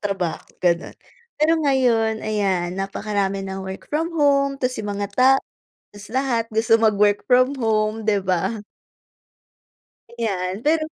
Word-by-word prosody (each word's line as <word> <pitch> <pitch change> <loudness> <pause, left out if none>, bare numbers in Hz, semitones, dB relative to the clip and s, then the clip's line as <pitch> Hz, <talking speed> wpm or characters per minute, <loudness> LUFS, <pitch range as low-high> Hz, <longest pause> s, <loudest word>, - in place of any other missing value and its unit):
trabaho, 195 -5 -2 0.2
gano'n. 170 -1 0 0.4
Pero 305 +2 +3
ngayon, 245 -6 +2
ayan, 195 -5 0
napakarami 195 0 -2
ng 190 0 -5
work 190 0 -7
from 320 +2 0
home 280 -2 +2
tapos 255 -1 -2
yung 210 - -4
mga 200 0 -3
ta 255 +4 +5 0.6
tapos 205 0 -13
lahat 260 -3 +1
gusto 225 +1 +3
mag-work 210 -2 +2
from 255 +2 +3
home, 220 -2 0
di 205 -2 +2
ba? 185 +4 -1 1.6
Ayan, 195 -2 -2
pero 310 +1 +2
215 Hz, 130 wpm, -22 LUFS, 195-255 Hz, 1.6 s, ta